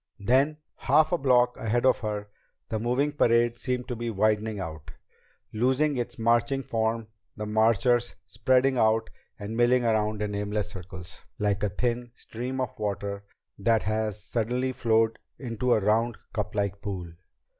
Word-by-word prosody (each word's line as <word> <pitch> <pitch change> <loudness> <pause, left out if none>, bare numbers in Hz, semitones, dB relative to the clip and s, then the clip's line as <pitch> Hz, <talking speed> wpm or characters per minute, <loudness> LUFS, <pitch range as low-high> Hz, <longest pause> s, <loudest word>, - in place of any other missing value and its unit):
Then, 135 +8 +2 0.2
half 155 0 +3
a 175 - +3
block 125 -2 +3
ahead 115 +3 0
of 130 - +4
her, 105 -1 -4 0.4
the 110 - -1
moving 125 +6 +1
parade 120 -4 +3
seemed 125 -1 -2
to 125 - -2
be 120 0 -3
widening 110 0 +1
out, 80 -4 -7 0.6
losing 130 +6 +2
its 120 - -3
marching 120 +4 +2
form, 115 -1 -1 0.3
the 105 - -4
marchers 115 +3 +2
spreading 125 +4 +2
out 110 0 +2 0.3
and 105 +2 -6
milling 120 +1 +3
around 110 -1 +1
in 105 -1 -3
aimless 105 0 -2
circles 90 -1 -10 0.2
like 105 -3 0
a 105 - +1
thin 120 +3 -2
stream 125 +4 -5
of 130 -4 -3
water 100 -1 -3 0.3
that 110 +2 +2
has 105 0 -2
suddenly 125 +4 -1
flowed 115 -2 +1 0.2
into 125 -1 -2
a 110 - +5
round, 110 +3 +1 0.2
cuplike 100 -2 -2
pool. 90 -5 -5
115 Hz, 150 wpm, -27 LUFS, 105-125 Hz, 0.6 s, a